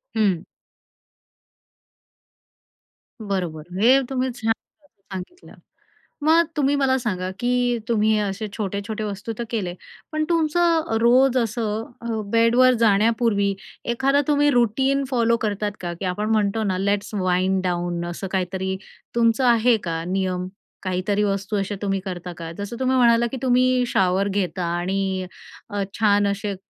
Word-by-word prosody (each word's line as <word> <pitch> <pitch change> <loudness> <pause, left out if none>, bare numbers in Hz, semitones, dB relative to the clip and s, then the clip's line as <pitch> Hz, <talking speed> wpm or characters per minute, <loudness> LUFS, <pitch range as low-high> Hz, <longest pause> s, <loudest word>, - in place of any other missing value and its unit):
हं. 195 -6 +1 2.8
बरोबर. 180 -7 -3 0.2
हे 260 +4 +6
तुम्ही 260 -1 -1
छान 225 -1 0
प्रकारे 285 -1 -9 0.2
सांगितलं. 355 - -11 0.7
मग 330 +1 +5
तुम्ही 285 0 +2
मला 265 -2 +2
सांगा, 185 -6 -2
की 245 -1 +1
तुम्ही 220 -1 +3
असे 205 +1 -2
छोटे-छोटे 205 +1 -3
वस्तू 205 +2 -4
तर 235 - -2
केले, 190 -7 -2 0.4
पण 310 0 0
तुमचं 330 -4 +2
रोज 255 +2 +4
असं, 225 -1 -1 0.2
अ, - - -6 0.3
बेडवर 240 +3 +5
जाण्यापूर्वी 210 -1 +3 0.4
एखादा 275 +4 +2
तुम्ही 290 0 +4
रूटीन 265 +3 +2
फॉलो 235 -2 +2
करता 210 -1 -1
का? 175 -1 -4
की 180 - -7
आपण 210 +4 -2
म्हणतो 215 0 +1
ना, 185 -2 0
लेट्स 200 +2 -1
वाइंड 185 0 +1
डाउन, 175 -1 -1
असं 190 +3 -5
काहीतरी 190 0 -1 0.4
तुमचं 230 +2 +3
आहे 235 0 +4
का? 165 -1 -2
नियम 185 0 -1 0.4
काहीतरी 190 +2 0
वस्तू 200 +1 -1
अशा 200 +1 -2
तुम्ही 195 -1 0
करता 180 -1 -5
का? 165 -1 -6
जसं 205 +4 -5
तुम्ही 260 0 +2
म्हणालात, 235 -1 +4
की - - -3
तुम्ही 255 0 +3
शॉवर 190 -1 +1
घेता 185 -3 -1
आणि 190 +1 -1 0.4
अ, 205 -1 -2 0.2
छान 205 -1 +3
असे 200 0 -2
210 Hz, 135 wpm, -23 LUFS, 190-245 Hz, 2.8 s, हे